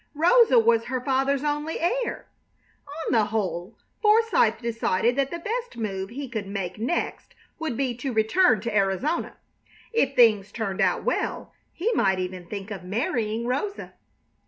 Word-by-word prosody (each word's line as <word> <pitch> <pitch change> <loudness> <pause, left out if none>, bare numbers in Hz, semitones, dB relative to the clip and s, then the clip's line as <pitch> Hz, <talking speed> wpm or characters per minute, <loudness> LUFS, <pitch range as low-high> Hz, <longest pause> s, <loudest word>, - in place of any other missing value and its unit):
Rosa 350 - +5
was 230 0 +4
her 255 0 -2
father's 270 +2 0
only 295 +2 -2
heir. 480 +9 -1 0.8
On - - -1
the 220 -3 +4
whole, 195 -2 -3 0.2
Forsythe 425 - +4
decided 230 -1 0
that 275 0 +1
the 340 - -4
best 465 - -4
move 195 -4 -3
he 270 +4 -6
could 220 -5 -5
make 195 -1 -4
next 250 +10 -3 0.2
would 315 -8 -3
be 265 -3 0
to 265 +1 -3
return 220 - +3
to 230 -1 -3
Arizona. 200 - 0 0.6
If 275 - +1
things 215 -5 +4
turned 200 -5 -3
out - - +2
well - - -2 0.2
he 415 +8 -1
might 190 - +2
even 180 -1 -5
think 200 +1 -6
of 195 -3 -6
marrying 220 +3 -1
Rosa. 285 +12 -3
235 Hz, 155 wpm, -25 LUFS, 210-295 Hz, 0.8 s, Rosa